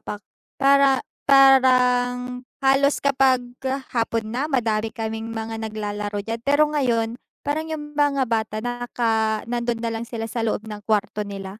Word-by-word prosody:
pa - - -6 0.4
para 275 -1 +4 0.2
parang 250 -2 +4 0.2
halos 275 +1 +4
kapag 265 -2 +3 0.5
hapon 230 -1 0
na 275 +5 -1
madami 225 -5 0
kaming 225 0 -5
mga 225 0 -5
naglalaro 210 -1 -4
diyan, 230 0 -4
pero 285 +5 +3
ngayon 235 -4 0 0.2
parang 310 +2 -2
yung 295 -2 -6
mga 285 -2 +2
bata 220 -2 -2
naka 230 -3 -1
nando'n 235 0 -2
na 230 - -1
lang 230 +1 -5
sila 225 -2 -4
sa 230 +1 -4
loob 225 -1 -1
ng 210 -1 -7
kuwarto 210 -1 0
nila. 195 +1 -7
235 Hz, 145 wpm, -23 LUFS, 220-270 Hz, 0.5 s, para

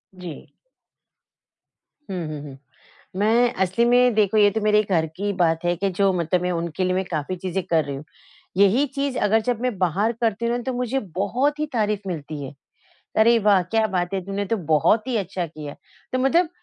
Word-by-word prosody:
जी। 180 -4 -9 1.6
हुँ, 180 -3 -3
हुँ, 150 -2 -6
हुँ। 140 -2 -10 0.6
मैं 235 +4 +3
असली 190 +6 +1
में 245 0 +4
देखो 215 0 +2
ये 205 -1 +6
तो 220 +1 -2
मेरे 210 0 +4
घर 160 -2 +3
की 205 +1 -1
बात 165 -3 +2
है 175 0 +2
कि 195 +2 0
जो 195 +1 +2
मतलब 175 0 0
मैं 180 - -1
उनके 170 +1 -2
लिए 185 0 +1
मैं 190 - 0
काफ़ी 170 +1 -3
चीज़ें 185 +1 -3
कर 160 -1 +1
रही 140 - -4
हूँ। 140 +3 -9 0.5
यही 200 +8 +4
चीज़ 275 -2 -1
अगर 220 +2 +3
जब 240 0 -2
मैं 250 -5 -1
बाहर 190 +5 +1
करती 225 0 0
हूँ 235 +1 +1
ना 245 - -4
तो 260 0 -2
मुझे 250 +2 -1 0.2
बहुत 255 +10 0
ही 305 - 0
तारीफ़ 210 -3 0
मिलती 155 -4 -5
है। 135 - -7 0.6
अरे, 230 +2 +6
वाह 205 -3 +4
क्या 220 +5 +1
बात 180 -1 -2
है! 190 - -1
तूने 200 +1 -3
तो 225 +3 -1 0.2
बहुत 215 - +3
ही 255 - -1
अच्छा 185 -2 -3
किया। 150 -2 -9 0.4
तो 255 - +1
मतलब 320 +6 +3
200 Hz, 200 wpm, -23 LUFS, 175-230 Hz, 1.6 s, ये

